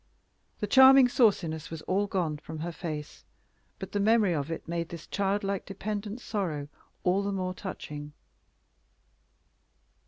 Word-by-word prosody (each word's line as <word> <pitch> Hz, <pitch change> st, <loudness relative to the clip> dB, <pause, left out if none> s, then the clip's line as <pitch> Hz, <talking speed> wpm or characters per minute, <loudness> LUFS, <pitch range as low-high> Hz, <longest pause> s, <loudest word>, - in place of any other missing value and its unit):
The -, -, +1 dB
charming 265 Hz, +3 st, +8 dB
sauciness 190 Hz, -, +2 dB
was 160 Hz, -1 st, -7 dB
all 200 Hz, +2 st, 0 dB
gone 170 Hz, -6 st, -1 dB
from 155 Hz, +1 st, -8 dB
her 175 Hz, +2 st, -3 dB
face, 155 Hz, -3 st, -6 dB, 0.5 s
but 190 Hz, -, -7 dB
the 205 Hz, -, -1 dB
memory 210 Hz, -2 st, +4 dB
of 145 Hz, -1 st, -2 dB
it 165 Hz, -, -5 dB
made 170 Hz, 0 st, -3 dB
this 170 Hz, -2 st, -8 dB
childlike 200 Hz, -1 st, -1 dB
dependent 205 Hz, +3 st, -5 dB
sorrow 160 Hz, -11 st, -3 dB, 0.3 s
all 185 Hz, +2 st, +2 dB
the 200 Hz, 0 st, -2 dB
more 185 Hz, -2 st, -2 dB
touching. 150 Hz, -6 st, -7 dB
190 Hz, 135 wpm, -29 LUFS, 160-205 Hz, 0.5 s, charming